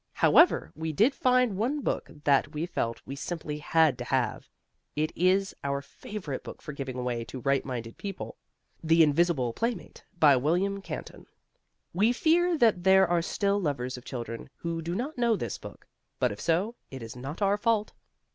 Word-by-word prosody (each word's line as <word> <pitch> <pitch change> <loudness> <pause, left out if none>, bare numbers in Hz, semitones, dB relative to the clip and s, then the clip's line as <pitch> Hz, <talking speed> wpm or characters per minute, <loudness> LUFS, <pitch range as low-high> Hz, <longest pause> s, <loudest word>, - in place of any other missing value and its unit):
However, 345 - +4
we 160 0 -3
did 220 - +3
find 250 -5 +2
one 265 +8 0
book - - -2
that 145 +1 +2
we 155 +3 -1
felt 115 -9 -3
we 135 - -6
simply 150 0 -5
had 160 -1 +3
to - - -3
have, - - -1
as - - -31 0.5
it 155 +1 0
is 190 +2 +2
our 140 0 -1
favourite 145 +1 -7
book - - -9
for 150 - -8
giving 135 -2 -5
away 125 -2 -2
to 130 - -7
right 135 +2 +1
minded 120 -4 -6
people 195 -2 -6 0.5
"The 165 +1 +5
Invisible 150 -5 +2
Playmate," 230 - -4 0.2
by 145 -4 +6
William 180 +9 0
Canton. - - -8 0.7
We 210 +7 +3
fear 340 +5 +3
that 220 -9 +3
there 190 0 +6
are 175 0 +2
still 200 +3 0
lovers 130 -6 -2
of 125 - -10
children 120 -3 -6
who 165 -1 -4
do 170 +2 -3
not 255 +6 -4
know 235 -2 +3
this 120 - -4
book; - - -11 0.3
but - - +1
if 105 - -7
so, 180 +7 +1 0.2
it 130 -3 -8
is 115 +1 -8
not 140 +10 -5
our 200 +1 +3
fault. 215 0 0
165 Hz, 185 wpm, -28 LUFS, 140-205 Hz, 0.7 s, by